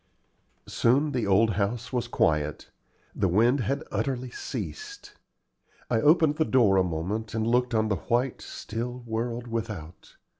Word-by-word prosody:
Soon 140 +6 +2
the 120 -6 -1
old 105 +3 +4
house 110 +5 -2
was 120 -2 -1
quiet. 75 -8 0 0.4
The - - +1
wind 115 +9 +3
had 140 +6 -1
utterly 130 -3 -2
ceased. 415 - -7 0.8
I 115 -2 +2
opened 155 0 +4
the 160 - +3
door 115 -10 +3
a 95 - +4
moment, 95 +7 -3
and 110 -1 0
looked 120 +1 +1
on 110 0 +2
the 100 -3 0
white, 120 +2 +1
still 120 +3 -6
world 115 +1 -3
without. 105 -8 -6
115 Hz, 145 wpm, -27 LUFS, 105-125 Hz, 0.8 s, old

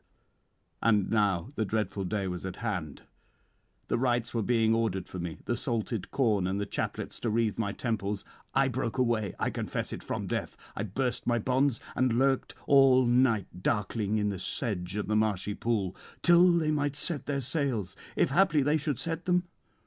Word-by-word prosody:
And 105 -4 +3
now 105 -3 +1
the 110 - -1
dreadful 105 -2 -2
day 100 +1 -1
was 90 -1 -4
at 95 -1 -5
hand; 90 -11 -4 0.8
the 120 - 0
rites 120 -2 0
were 115 - 0
being 115 0 +3
ordered 110 -5 0
for 95 - -7
me, 85 -2 -4
the 120 - 0
salted 115 -4 -2
corn, 105 -8 +1
and 95 +2 -1
the 100 - -1
chaplets - - -4
to 120 - -1
wreathe 110 -1 0
my 100 -3 0
temples. 105 -3 -2 0.3
I 135 0 +4
broke 125 -1 -2
away, 115 -6 +1
I - - 0
confess - - -3
it, - - -6
from - - -4
death; - - -3 0.2
I - - -3
burst 120 +5 -2
my 120 -1 +3
bonds, 130 +2 +1 0.2
and 130 -2 +2
lurked 135 0 +1
all 135 -2 +6
night 120 -7 +2
darkling 105 +1 0
in 105 -1 +1
the 100 -2 -4
sedge 95 -3 -2
of 105 - -1
the 105 - 0
marshy 105 -2 +1
pool, 100 -5 -1 0.3
till 175 +1 +7
they 165 -3 +2
might 145 -1 0
set 145 -2 -1
their 140 -1 0
sails, 125 - -1 0.2
if - - +2
haply 155 -3 +4
they 150 +3 +3
should 150 -3 -2
set 165 +4 -3
them. 180 -1 +2
115 Hz, 185 wpm, -29 LUFS, 100-135 Hz, 0.8 s, till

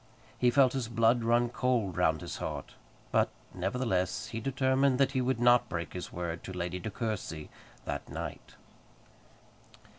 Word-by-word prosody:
He 125 - +3
felt 130 0 +5
his 130 -4 -1
blood 115 +1 +3
run 120 +1 +3
cold 120 -6 0
round 80 -3 +2
his - - -5
heart; - - -5 0.4
but, - - +3 0.2
nevertheless, 95 0 -1
he 115 - -4
determined 130 +1 +2
that 135 0 +3
he 130 -2 +1
would 125 -1 0
not 120 0 +5
break 85 -1 -4
his 90 -1 -6
word 85 -1 -4
to - - -6
Lady 90 0 -3
De 110 - -4
Courcy 105 -9 -4 0.3
that - - -4
night. - - -6
115 Hz, 155 wpm, -31 LUFS, 90-125 Hz, 0.4 s, felt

